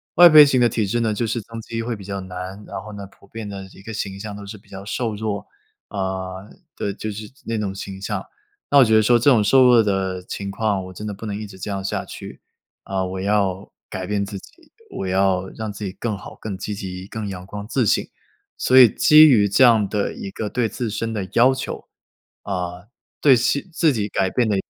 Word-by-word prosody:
外 175 0 +9
配 155 -1 +10
型 130 -3 +2
的 120 - +6
体 110 -2 0
质 120 - 0
呢， 110 -2 +1
就 115 +3 -1
是 115 +1 -2
增 115 +1 -9
肌 115 +1 -5
会 115 0 -3
比 100 - -11
较 100 0 -4
难， 95 +2 -7
然 - - -5
后 110 - -9
呢， 100 -1 -8
普 100 - -22
遍 110 +1 -7
的 95 -1 -7
一 - - -15
个 115 +2 -8
形 100 -2 -4
象 105 0 -6
都 100 -1 -9
是 105 +2 -8
比 - - -23
较 95 0 -9
瘦 115 -1 -2
弱。 105 -1 -4 0.4
呃， 95 0 -4 0.3
对， 100 - -3
就 110 +1 -5
是 105 +1 -8 0.2
那 115 -1 -2
种 100 -2 -3
形 95 -1 -7
象， - - -3 0.5
那 145 - +4
我 140 - +9
觉 110 0 +3
得 110 - +6
说 120 +2 +4
这 120 - +4
种 115 -6 +5
瘦 130 +5 +5
弱 120 -2 +6
的 95 -2 -1
情 100 +2 -5
况， 100 -3 -1
我 95 - -10
真 105 - -8
的 105 - -4
不 105 +3 -9
能 105 -1 -3
一 110 - -5
直 95 -2 -12
这 105 - -5
样 95 -1 -3
下 95 - -2
去， - - -10 0.4
啊， 95 -1 -2
我 95 0 -5
要 100 -1 0 0.2
改 95 - -5
变 100 -1 -1
自 100 0 -7
己， - - -17 0.4
我 - - -4
要 95 0 +1
让 110 -2 -6
自 105 - -8
己 95 - -3
更 110 0 -4
好、 100 - -11
更 100 -4 -5
积 105 +2 -4
极、 95 -1 -7
更 110 -1 -5
阳 95 -2 -7
光 105 +1 -7
自 120 +1 +1
信。 - - +1 0.5
所 130 - +3
以 125 - +9
基 155 +8 +7
于 105 -8 +4
这 100 +7 +4
样 115 -4 +5
的 105 -2 -1
一 95 - -7
个 105 +1 -4
对 120 -2 0
自 115 +2 -3
身 115 +2 -3
的 100 -3 -3
要 125 +3 +5
求， 130 - -6 0.5
啊， 90 -1 -4 0.3
对 135 -3 +6
期 140 +8 0
自 160 -3 +3
己 105 -4 -1
改 95 -2 0
变 120 +1 +1
的 105 - +1
105 Hz, 260 characters per minute, -22 LUFS, 95-115 Hz, 0.5 s, 配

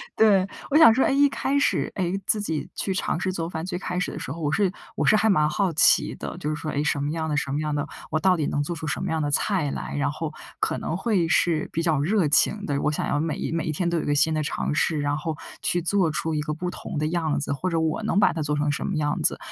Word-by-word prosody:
对， 200 -4 +4 0.2
我 300 - +5
想 230 -8 +9
说， 260 - +2
哎， - - +2
一 285 +1 +5
开 280 +1 0
始， 285 - +1
哎， 180 -2 -1
自 215 - +2
己 160 -7 -3
去 195 - -2
尝 185 - -1
试 185 +1 -1
做 165 -2 -3
饭。 160 0 -4
最 180 -1 -3
开 180 -1 -3
始 - - -2
的 - - -7
时 - - -6
候， 165 - -6
我 150 - 0
是 195 +2 +2 0.2
我 - - 0
是 - - +5
还 220 +1 +2
蛮 155 -6 +4
好 190 +2 0
奇 155 - +4
的。 - - -6
就 150 - -3
是 155 - -1
说， 155 0 -4
哎， 145 - -1
什 145 - 0
么 145 - -1
样 160 0 -2
的 150 - 0
什 135 - -1
么 145 - -1
样 150 -1 -1
的 145 - -1 0.3
我 155 - +1
到 185 0 +4
底 155 - 0
能 145 - 0
做 175 - -3
出 155 0 -6
什 165 - -2
么 185 - -2
样 160 -1 0
的 145 - 0
菜 155 0 +1
来？ - - -5
然 145 0 +1
后 155 +1 -5 0.3
可 - - 0
能 - - -3
会 195 -5 +1
是 160 -1 +1
比 165 - 0
较 160 -4 +2
热 180 +3 +2
情 205 +7 +2
的， 140 -1 -1
我 - - +1
想 150 - -2
要 145 - 0
每 160 0 -2
每 165 -1 -1
一 - - -1
天 175 +3 -1
都 170 -1 0
有 - - -4
个 145 - +1
新 150 +2 +3
的 155 - 0
尝 150 - -2
试， 155 0 +1
然 145 0 0
后 160 -1 -4 0.2
去 175 - 0
做 185 -2 +2
出 160 +1 -2
一 150 - 0
个 150 0 -3
不 180 +3 -4
同 - - -7
的 155 +1 0
样 160 -2 0
子 140 - -3
或 180 +6 -2
者 165 - -1
我 160 +4 0
能 215 - 0
把 - - +5
它 165 - -3
做 150 0 -1
成 145 0 +1
什 140 - -3
么 195 - -2
样 150 -1 -1
子。 - - +2
160 Hz, 320 characters per minute, -25 LUFS, 150-185 Hz, 0.3 s, 想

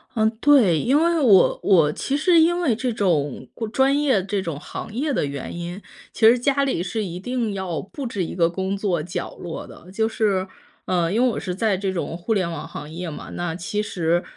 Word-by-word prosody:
嗯， 220 -1 +3
对， 255 - +5
因 275 - +2
为 335 0 +2
我 205 -9 +5
我 165 -7 +4
其 280 +1 -2
实 335 +1 +4
因 345 +2 +3
为 270 -10 +2
这 250 +2 -2
种 155 - 0 0.2
专 270 +2 +3
业、 265 -10 +2
这 200 0 -2
种 165 -6 -4
行 210 - -8
业 285 +5 -1
的 220 - 0
原 140 +2 -6
因， 175 +3 -6 0.3
其 220 - +4
实 235 +2 +6
家 275 +3 +1
里 255 -11 -1
是 210 +4 -2
一 180 -2 -5
定 235 0 -2
要 180 -6 -3
布 270 - -8
置 205 -6 -2
一 - - -6
个 170 -2 +3
工 190 +2 -2
作 195 -5 -1
角 175 +3 -5
落 170 -2 -7
的。 180 - -14
就 220 +2 +1
是 200 -4 0 0.4
嗯， 175 -1 0
因 230 - +2
为 - - +5
我 230 - -3
是 180 - -4
在 210 -1 +1
这 195 0 -2
种 170 -2 -3
互 180 +6 -1
联 185 -5 0
网 165 -3 -6
行 150 +1 -8
业 175 +1 -5
嘛， 150 - -8
那 175 -2 -3
其 190 +4 -2
实 175 -4 0
195 Hz, 240 characters per minute, -23 LUFS, 175-240 Hz, 0.4 s, 实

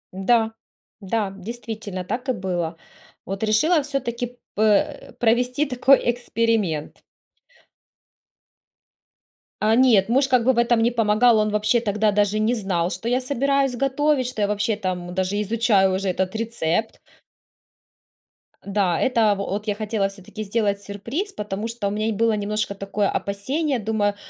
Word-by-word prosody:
Да, 225 +3 +2 0.5
да, 200 0 -1
действительно 215 -1 -6
так 250 +8 -4
и - - +3
было. 175 -4 -3 0.5
Вот 195 +3 -4
решила 295 +10 +3
всё-таки 245 -3 -4 0.2
п 210 - -3
э, 210 -2 +1
провести 245 +4 +1
такой 265 0 +4
эксперимент. 225 -9 -1 2.6
А 215 +1 +3
нет, 230 -5 +4
муж 270 +3 +3
как 255 -3 +3
бы 260 - +4
в 235 - -6
этом 235 -1 +3
не 240 - +3
помогал, 225 +1 +4
он 215 0 +2
вообще 210 +3 +2
тогда 210 -1 +1
даже 205 +1 +1
не 220 +3 +2
знал, 190 -6 -1
что 230 - -5
я 250 +2 +1
собираюсь 275 0 +1
готовить, 275 +1 +1
что 235 -4 -4
я 205 - +2
вообще 210 +1 0
там 180 -3 -4
даже 190 +3 -1
изучаю 205 -3 +2
уже 195 0 -1
этот 190 +3 -2
рецепт. 220 -2 -1 1.7
Да, 195 -4 0
это 225 -5 +3
вот 200 +2 -4
я 205 - 0
хотела 210 -2 -1
всё-таки 195 +2 -9
сделать 205 -1 -1
сюрприз. 235 - -5
Потому 210 +1 -4
что 230 -3 -3
у - - -1
меня 215 +1 -1
и - - +1
было 225 +1 +1
немножко 210 0 -2
такое 200 +1 -1
опасение, 265 +9 -1
думаю, 205 -1 0
215 Hz, 150 wpm, -23 LUFS, 200-240 Hz, 2.6 s, такой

